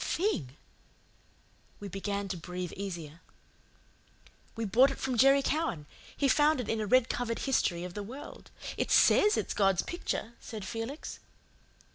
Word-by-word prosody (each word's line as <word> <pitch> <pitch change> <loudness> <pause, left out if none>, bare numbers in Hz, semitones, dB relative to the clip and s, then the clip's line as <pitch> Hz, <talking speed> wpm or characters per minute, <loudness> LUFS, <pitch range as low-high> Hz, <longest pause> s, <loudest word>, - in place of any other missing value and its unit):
THING! 160 - -1 1.2
We 205 - -6
began 200 +1 -3
to 190 - -2
breathe 180 +1 -6
easier. 170 -5 -6 1.3
"We 225 - -2
bought 245 +7 +5
it 275 - -5
from 260 -1 -2
Jerry 275 +3 +5
Cowan. 295 - -1 0.3
He 280 - +2
found 295 +2 +4
it 245 - -3
in 225 -1 0
a 210 - -2
red 255 +2 +4
covered 235 -2 -2
history 175 -10 +1
of 180 -1 -6
the 205 - -4
world. 250 +8 -9 0.3
It - - -1
SAYS 420 +1 +5
it's - - -1
God's 195 -3 +2
picture," 240 -9 -4
said 215 -4 -7
Felix. 230 +8 -5
225 Hz, 150 wpm, -30 LUFS, 190-270 Hz, 1.3 s, bought